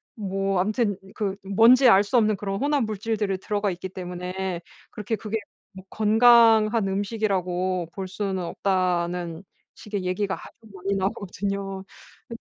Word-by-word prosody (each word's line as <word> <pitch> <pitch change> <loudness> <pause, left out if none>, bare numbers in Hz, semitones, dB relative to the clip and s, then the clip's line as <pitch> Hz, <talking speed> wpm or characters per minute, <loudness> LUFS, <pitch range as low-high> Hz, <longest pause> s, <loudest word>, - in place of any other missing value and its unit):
뭐 195 -2 -1
암튼 205 +1 0 0.2
그 200 -3 -2
뭔지 230 +6 +6
알 200 -2 +6
수 210 - -3
없는 215 -2 +3
그런 195 0 -3
혼합 285 -1 +1
물질들이 215 -2 -2
들어가 205 0 -1
있기 180 +1 -6
때문에 180 0 -5 0.3
그렇게 210 +1 -3
그게 215 +1 -3 0.4
뭐 190 0 -11
건강한 225 -1 +5
음식이라고 185 -3 -1
볼 190 -2 -5
수는 190 -1 -3
없다는 175 -1 -1 0.3
식의 205 -2 -5
얘기가 190 +2 -1
아주 220 -2 -15
많이 195 +1 -2
나오거든요. 195 0 -3 0.5
그 230 - -6
195 Hz, 295 characters per minute, -25 LUFS, 185-215 Hz, 0.5 s, 뭔지